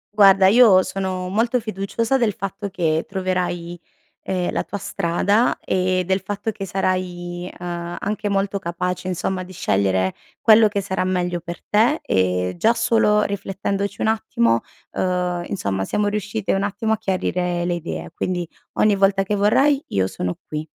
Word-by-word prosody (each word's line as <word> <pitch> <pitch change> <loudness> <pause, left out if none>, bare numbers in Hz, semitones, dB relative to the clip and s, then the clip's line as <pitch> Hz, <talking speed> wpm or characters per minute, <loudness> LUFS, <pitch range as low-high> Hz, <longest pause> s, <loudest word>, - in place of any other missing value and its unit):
Guarda, 195 -2 +7
io 200 -2 +7
sono 185 -1 -3
molto 230 +6 +1
fiduciosa 220 +4 -1
del 225 -4 +2
fatto 200 +1 -5
che 165 -4 0
troverai, 180 -2 -2 0.4
ehm, 180 -2 -2
la - - -1
tua 205 - -5
strada 200 +5 +1
e 185 0 0
del 190 +2 +1
fatto 205 +3 -3
che 195 -2 -6
sarai, 180 -1 -2
uhm, 175 -1 -5
anche 210 +1 -2
molto 200 0 0
capace, 180 +1 -3
insomma, 185 +1 -2
di 185 +1 -11
scegliere 95 - +1 0.3
quello 220 0 +6
che 205 -1 -2
sarà 190 -1 -2
meglio 180 -1 -1
per 170 0 -8
te, 230 +9 +3
e 90 -1 +1
già 230 +5 +4
solo 225 -3 +3
riflettendoci 200 0 -3
un - - +1
attimo, 115 - +1 0.3
uhm, 180 -1 -1
insomma 100 - -2
siamo 205 - 0
riuscite 210 0 -2
un 195 - +1
attimo 205 +2 -1
a 220 - +2
chiarire 180 -3 -1
le 175 - 0
idee, 170 -1 -5
quindi 175 -2 -2 0.3
ogni 210 -1 +3
volta 195 0 +3
che 200 - -2
vorrai 270 +8 +3
io 95 -1 +1
sono 90 -1 -3
qui. 155 0 -4
190 Hz, 160 wpm, -21 LUFS, 175-205 Hz, 0.4 s, Guarda